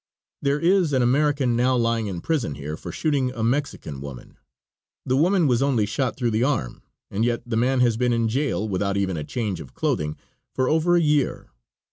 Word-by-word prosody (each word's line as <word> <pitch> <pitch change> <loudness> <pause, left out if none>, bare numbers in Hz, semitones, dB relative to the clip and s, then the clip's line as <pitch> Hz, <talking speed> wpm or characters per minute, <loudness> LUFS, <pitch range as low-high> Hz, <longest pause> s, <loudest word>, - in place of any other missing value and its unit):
There 140 +1 +1
is 175 -2 +3
an 130 -2 +3
American 135 -1 +2
now 125 +2 +2
lying 115 -2 0
in 90 -4 -5
prison 135 - -1
here 75 +2 -5
for - - -8
shooting 140 -5 0
a 115 -3 -4
Mexican 115 - -2
woman; 70 -3 -10 0.7
the 130 - +1
woman 175 +4 +3
was 125 -3 +2
only 130 -6 +2
shot 125 +5 -2
through 120 -3 0
the 110 +2 +1
arm, 130 - -1 0.3
and 105 +3 0
yet 120 0 0
the 120 -2 -3
man 125 +3 +2
has 120 -3 +3
been 125 0 +1
in 115 -1 +1
jail, 125 -2 -1
without 100 0 -1
even 95 -2 0
a 75 - -3
change 105 - -3
of 65 - -12
clothing, 75 0 -1 0.4
for 130 -1 +1
over 160 +4 +3
a 175 - +4
year. 150 -3 0
120 Hz, 200 wpm, -24 LUFS, 105-140 Hz, 0.7 s, a